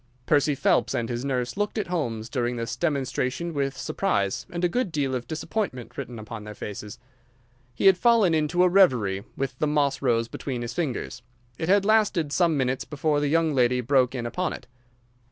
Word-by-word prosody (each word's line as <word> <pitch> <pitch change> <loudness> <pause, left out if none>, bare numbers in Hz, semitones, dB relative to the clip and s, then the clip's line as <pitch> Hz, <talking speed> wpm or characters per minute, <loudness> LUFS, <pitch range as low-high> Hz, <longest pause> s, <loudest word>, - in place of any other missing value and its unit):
Percy 145 0 +3
Phelps 135 - +2
and 120 -2 -1
his 120 0 -3
nurse 125 -3 -2
looked 205 +2 -2
at 210 - 0
Holmes 120 -11 -3
during 120 -1 -1
this 115 0 -3
demonstration 140 +2 -1
with 140 -2 -2
surprise 100 - -1
and 175 0 -5
a - - +5
good 210 +1 -1
deal 140 -4 -1
of 125 -2 -3
disappointment 155 - -4
written 120 - -6
upon 110 0 -8
their 105 0 -8
faces. 105 0 -7 0.8
He - - -2
had 190 -2 +7
fallen 230 -7 +4
into 160 +3 +2
a - - +6
reverie, 125 - +3
with 135 -1 -3
the 155 - +1
moss 145 -2 +1
rose 115 -3 +1
between 125 0 -5
his 120 - -5
fingers. 155 -8 -3 0.4
It 160 +1 -2
had 200 0 +4
lasted 205 -8 +2
some 170 -4 +2
minutes 130 -1 0
before 150 0 0
the 145 - 0
young 160 +1 +2
lady 125 -1 +3
broke 130 0 +2
in 120 -2 -3
upon 180 +11 -2
it. - - -9
140 Hz, 190 wpm, -25 LUFS, 120-170 Hz, 0.8 s, had